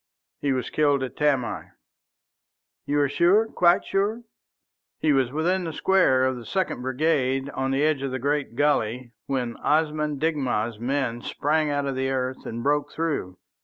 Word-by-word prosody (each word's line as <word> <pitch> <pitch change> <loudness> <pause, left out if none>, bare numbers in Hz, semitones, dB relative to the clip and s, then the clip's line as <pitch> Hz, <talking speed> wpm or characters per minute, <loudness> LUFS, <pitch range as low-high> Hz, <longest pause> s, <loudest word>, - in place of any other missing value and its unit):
"He 140 - 0
was 130 -1 -2
killed 145 -3 +2
at 130 - -5
Tamai." 140 -5 0 1.2
"You 145 0 +2
are 145 - +3
sure 175 +10 +3
quite 180 -5 +3
sure?" 210 +4 -1 0.7
"He 155 -2 +2
was 130 -3 +2
within 175 +5 0
the 165 -2 -4
square 150 -9 +3
of 130 -1 0
the 120 - -8
Second 185 -4 -2
Brigade 135 0 0
on 135 0 -2
the 135 +2 +1
edge 155 -3 +2
of 135 - -2
the 130 - -3
great 140 -1 -1
gulley 125 -4 0 0.2
when 125 -4 -2
Osman 150 -1 0
Digna's 130 -8 -1
men 120 -1 -1
sprang 150 +4 0
out 145 -1 -1
of 135 -1 -2
the 130 0 -1
earth 130 -1 -3
and 115 +1 -5
broke 145 0 +1
through. 150 - -3
140 Hz, 165 wpm, -25 LUFS, 130-155 Hz, 1.2 s, are